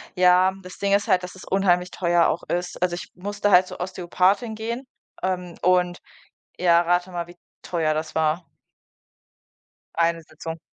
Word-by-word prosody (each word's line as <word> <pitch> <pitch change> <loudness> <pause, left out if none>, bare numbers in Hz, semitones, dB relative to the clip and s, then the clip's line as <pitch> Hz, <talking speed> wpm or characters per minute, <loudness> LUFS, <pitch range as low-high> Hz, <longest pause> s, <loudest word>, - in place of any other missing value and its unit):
Ja, 180 +1 +5
das 185 0 -11
Ding 200 0 0
ist 200 0 +2
halt, 180 0 +3
dass 180 - -7
es 185 - -12
unheimlich 180 -2 +2
teuer 175 -1 +2
auch 170 - -1
ist. 175 0 -3
Also 175 -1 +1
ich - - -8
musste 205 +2 -1
halt 185 0 +6
zur - - -9
Ostheopathin 185 +5 0
gehen, 235 +4 -4 0.4
ähm, 180 -2 -2
und 180 -1 +2 0.6
ja, 170 -1 +5
rate 175 +1 +1
mal, 175 -1 -4
wie 175 - -14 0.3
teuer 160 -3 0
das 155 0 -4
war. 160 +2 +1 1.5
Eine 170 0 +1
Sitzung. 160 +1 -8
180 Hz, 160 wpm, -24 LUFS, 170-185 Hz, 1.5 s, halt